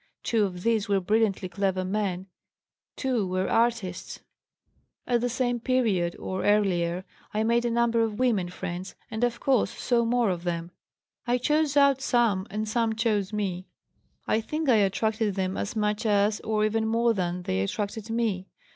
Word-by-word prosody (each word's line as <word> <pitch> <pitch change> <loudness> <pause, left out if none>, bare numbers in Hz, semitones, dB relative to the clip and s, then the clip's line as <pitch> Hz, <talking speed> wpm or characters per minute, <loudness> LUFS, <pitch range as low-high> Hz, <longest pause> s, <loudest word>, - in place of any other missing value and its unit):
Two 220 -3 +2
of 180 -2 -6
these 225 -2 +1
were 200 -1 +3
brilliantly 205 0 +1
clever 190 0 -1
men; 190 -2 -2 0.7
two 250 -7 0
were 185 +1 -1
artists. 230 -6 0 0.9
"At 240 -2 +1
the 245 - 0
same 245 0 0
period, 225 -9 +1
or 185 0 -4
earlier, 185 -4 +1 0.3
I 215 - +2
made 235 +1 +2
a - - +2
number 235 0 +2
of 220 -2 -1
women 220 -8 +1
friends, 180 +1 -6 0.2
and 220 +1 -2
of 240 -1 0
course 270 -2 +2
saw 240 -2 0
more 235 -2 +2
of 175 -1 -4
them. 170 -1 -3 0.6
I 245 +1 +3
chose 295 +3 +1
out 280 -2 +5
some 230 -7 +2
and 215 +2 -3
some 225 0 0
chose 215 -3 0
me; 190 -4 -3 0.6
I 220 - +1
think 305 +5 -2
I 235 - +6
attracted 210 +1 +1
them 190 -1 -1
as 205 - -3
much 210 +1 0
as, 205 0 +2
or 215 -1 0
even 220 +1 0
more 230 +1 +2
than, 180 -2 -2
they 95 - -1
attracted 205 - -3
me. 220 -5 -1
215 Hz, 170 wpm, -27 LUFS, 190-235 Hz, 0.9 s, I